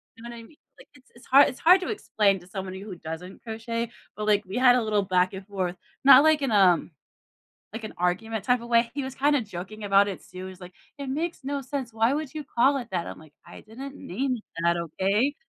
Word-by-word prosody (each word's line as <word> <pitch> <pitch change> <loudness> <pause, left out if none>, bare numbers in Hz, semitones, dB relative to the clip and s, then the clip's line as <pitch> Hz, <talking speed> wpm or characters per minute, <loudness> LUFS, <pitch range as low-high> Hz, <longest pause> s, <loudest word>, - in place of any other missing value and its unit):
you 225 - -15
know 235 0 -8
I 230 - -9
mean? 295 - -18 0.2
Like, - - -16
it's 260 - -22
it's 235 - -17
hard 275 +2 +7
it's 255 - -9
hard 365 +3 +6
to - - -4
explain 205 - +1
to 175 - -17
somebody 190 -1 -6
who 200 -3 -8
doesn't 165 +3 -8
crochet, 230 +1 -4 0.2
but, 210 - -4
like, 210 0 +3
we 190 +5 -5
had 250 -1 +6
a 250 - +2
little 210 -2 +1
back 185 0 +1
and 190 0 -8
forth, 190 -3 -3 0.3
not, 280 +1 +9
like, 315 -1 +4
in 260 - 0
a 190 -5 +5 1.0
like, 225 0 -6
an 215 - -7
argument 195 +5 -1
type 250 -1 +2
of 235 - -10
way; 235 0 +3
he 280 -1 -3
was 265 0 -6
kinda 285 -1 +2
joking 205 +1 -8
about 200 0 +4
it, 195 - -5
too 185 - -15
he - - -7
was, 185 - -15
like, 180 0 -10 0.3
"It 280 -1 -6
makes 315 +1 -3
no 280 +1 -3
sense, 260 -3 -5
why 225 +4 +2
would 305 -1 -4
you 305 -1 -5
call 270 +3 +2
it 240 -3 -6
that?" 175 -2 -2
I'm, - - -8
like, 155 -2 -17
"I - - -12
didn't 270 +6 -9
name 265 -2 -3 0.3
that 170 0 +3
okay?" 195 - 0
225 Hz, 245 wpm, -26 LUFS, 190-265 Hz, 1.0 s, not